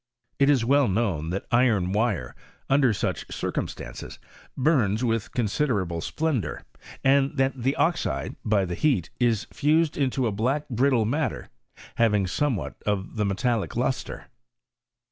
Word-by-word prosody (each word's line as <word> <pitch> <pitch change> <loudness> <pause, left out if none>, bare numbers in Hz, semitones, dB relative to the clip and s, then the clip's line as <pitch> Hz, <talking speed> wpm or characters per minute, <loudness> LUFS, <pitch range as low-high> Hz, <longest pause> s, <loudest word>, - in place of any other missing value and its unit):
It 140 0 +5
is 130 -5 +3
well 140 +1 +4
known 95 -7 0
that 95 +3 -3
iron 115 -7 +3
wire, 110 -2 0 0.4
under 135 -3 +4
such 105 - -3
circumstances, - - -5 0.4
Imms 125 -7 +2
with 115 -2 -1
considerable 105 - 0
splendour, 150 - -2 0.4
and 135 +1 +3
that 135 0 +2
the 135 +4 +1
oxide, 160 - 0
by 105 -3 +2
the 90 - -4
heat, 95 - +1
is 115 -4 +2
fused 155 +2 +2
into 135 -2 0
a 115 - +1
black 125 +9 -1
brittle 125 -1 +2
mat 140 +6 +1
ter, - - -9 0.5
having 105 -4 +3
somewhat 115 +2 -2
of 100 -1 -2
the 105 - +1
metallic 105 +3 -1
lustre. 125 +2 -2
120 Hz, 140 wpm, -25 LUFS, 100-140 Hz, 0.5 s, It